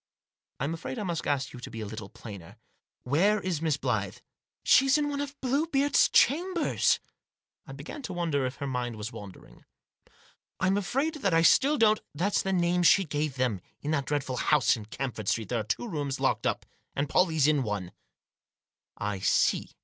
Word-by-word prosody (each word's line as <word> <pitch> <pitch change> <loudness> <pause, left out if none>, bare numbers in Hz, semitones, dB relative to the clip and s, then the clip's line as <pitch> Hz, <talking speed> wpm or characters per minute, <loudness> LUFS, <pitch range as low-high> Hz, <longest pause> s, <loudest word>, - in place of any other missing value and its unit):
" - - -60
Fm 140 +5 -1
afraid 165 +9 -6
I 215 - -3
must 170 -4 -3
ask 140 -2 -1
you 125 - -9
to 120 - -8
be 115 - -8
a 110 - -4
little 105 -1 -7
plainer. 100 -7 -11 0.5
Where 185 +11 +2
is 180 -5 -3
Miss 155 -3 +1
Blyth?" - - -2 0.2
" - - -62
She's 270 +2 +5
in 295 -1 0
one 285 0 -2
of 285 0 -6
Bluebeard's 280 +2 +2
Chambers? 340 +5 +2 0.3
" - - -47
I - - -8
began 295 - -8
to 205 -8 -6
wonder 165 -6 0
if 130 - -6
her 140 - -5
mind 125 -3 -3
was 105 +2 -6
wandering. 105 -5 -12 0.5
" - - -32
I'm 190 +1 +2
afraid 275 - -1
that 195 -5 +2
I 165 - +4
still 280 - +5
don't 215 -2 +4
" - - -49
" - - -34
That's 190 +7 +1
the 195 - -2
name 180 -1 +2
she 195 +3 +5
gave 150 -2 -2
them. 125 -8 -1 0.2
In 150 - -2
that 140 -3 -1
dreadful 140 -3 -2
house 150 +1 +3
in 110 -3 -8
Camford 110 -2 -5
Street 110 0 0
there 120 - 0
are - - -2
two 110 - -3
rooms 145 -8 -3
locked - - +1
up, - - -2 0.3
and 140 +1 0
Pollie's 160 -3 +2
in 150 -2 +3
one," 105 -6 -3 1.1
"I 105 -2 -3
see." - - +2
155 Hz, 205 wpm, -28 LUFS, 125-210 Hz, 1.1 s, She's